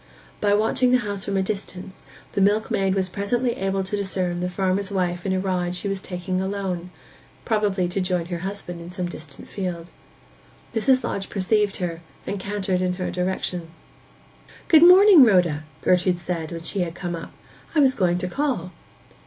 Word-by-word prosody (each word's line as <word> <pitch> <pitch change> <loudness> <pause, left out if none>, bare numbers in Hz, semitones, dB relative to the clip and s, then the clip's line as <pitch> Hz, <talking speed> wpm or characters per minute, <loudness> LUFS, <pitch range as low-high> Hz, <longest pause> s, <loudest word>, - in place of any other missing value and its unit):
By 205 -1 +3
watching 225 +4 +2
the 255 - +6
house 205 -5 -4
from 200 -1 -2
a 190 - +2
distance 190 -2 -6 0.2
the 200 - -1
milkmaid 200 -1 +2
was 190 -1 +1
presently 215 +7 -1
able 195 -2 -1
to 190 +2 -3
discern 185 -3 -2
the 180 0 -1
farmer's 190 +1 -1
wife 180 -2 -1
in - - 0
a 190 - +1
ride 180 -2 -1
she 180 - -4
was 195 -1 -2
taking 185 -1 -3
alone—probably 190 +1 -3
to 190 +2 -1
join 180 -2 -1
her 175 0 -4
husband 185 -2 -6
in 170 - -9
some 180 0 -3
distant 155 -5 -11
field. 175 -3 -5 0.8
Mrs. 255 +3 +3
Lodge 195 - -3
perceived 205 +1 +1
her, 170 -2 -4 0.2
and 200 - -3
cantered 190 -2 -1
in 180 0 0
her 180 0 -3
direction. 180 -1 -2 1.0
'Good 315 -2 +7
morning, 365 0 +9
Rhoda!' 175 -9 +3 0.2
Gertrude 180 0 +3
said, 175 -2 -4
when 165 -1 -6
she 195 - -3
had 170 -2 -2
come 175 -1 -4
up. 165 - -8 0.4
'I 300 - +5
was 265 -2 +5
going 180 -6 +1
to 180 0 -2
call. 215 - -2
190 Hz, 175 wpm, -23 LUFS, 180-205 Hz, 1.0 s, morning